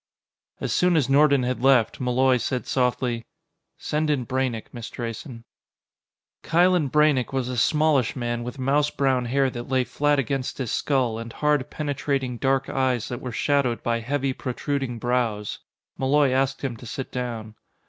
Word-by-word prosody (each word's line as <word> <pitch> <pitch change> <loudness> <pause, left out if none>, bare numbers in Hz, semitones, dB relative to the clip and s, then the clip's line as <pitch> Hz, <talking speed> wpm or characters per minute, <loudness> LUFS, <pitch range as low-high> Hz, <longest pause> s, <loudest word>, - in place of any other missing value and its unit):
As - - -2
soon 180 -2 +3
as 135 -4 +1
Nordon 140 -1 +5
had 125 -1 -2
left, 130 -4 +3
Malloy 130 +1 +3
said 125 +2 -2
softly: 125 -2 0 0.5
"Send 155 +1 -1
in 135 -5 0
Braynek, 130 -3 -2
Miss 120 -2 -7
Drayson." 115 0 -6 1.0
Kylen 175 -3 +3
Braynek 150 -3 +3
was 130 -2 -1
a 125 - -3
smallish 145 +1 +2
man 120 -2 -2
with 125 +3 -6
mouse 140 +3 +2
brown 130 -3 +1
hair 135 +2 +1
that 120 0 -7
lay 130 -1 +2
flat 145 +3 +1
against 135 -1 -2
his 130 -5 -3
skull, 125 -6 0
and 115 0 -7
hard, 150 0 0
penetrating, 140 -4 -2
dark 135 0 +1
eyes 130 -4 0
that 120 - -5
were 125 - -5
shadowed 135 -1 0
by 115 0 0
heavy, 135 +3 -1
protruding 135 -1 -3
brows. 115 -4 -1 0.4
Malloy 140 +1 +3
asked 135 +1 0
him 130 -4 -2
to 120 - -11
sit 130 +3 -5
down. 115 -4 -4
130 Hz, 160 wpm, -24 LUFS, 120-140 Hz, 1.0 s, Nordon